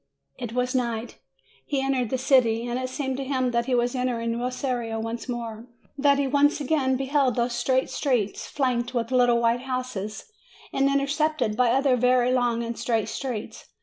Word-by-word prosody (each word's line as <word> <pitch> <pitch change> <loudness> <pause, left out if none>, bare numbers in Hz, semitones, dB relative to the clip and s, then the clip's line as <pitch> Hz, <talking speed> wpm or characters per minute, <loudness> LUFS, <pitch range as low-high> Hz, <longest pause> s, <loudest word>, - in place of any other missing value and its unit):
It 240 -3 -5
was 250 0 0
night. 235 -2 -2 0.4
He 275 - -1
entered 265 -3 0
the 260 - 0
city, 245 -3 +3
and 245 +1 -2
it 255 0 -3
seemed 265 -1 -3
to 275 - -3
him 260 -2 0
that 235 0 0
he 255 - +2
was 240 0 +1
entering 235 -2 -1
Rosario 245 -2 -2
once 225 +3 -5
more; 230 -1 -5 0.3
that 280 0 +3
he 280 - +1
again 285 -1 +2
beheld 270 -2 +1
those 240 0 0
straight 255 +2 +1
streets, 240 -8 -1
flanked 250 -3 -1
with 230 0 -1
little 245 -2 +4
white 235 +1 +2
houses, 255 - -5 0.4
and 275 0 +2
intersected 280 -3 0
by 245 +1 +3
other 265 +1 +3
very 250 0 +3
long 240 -2 +1
and 230 -1 -5
straight 225 -2 0
streets. 245 -4 -5
250 Hz, 175 wpm, -25 LUFS, 235-265 Hz, 0.4 s, little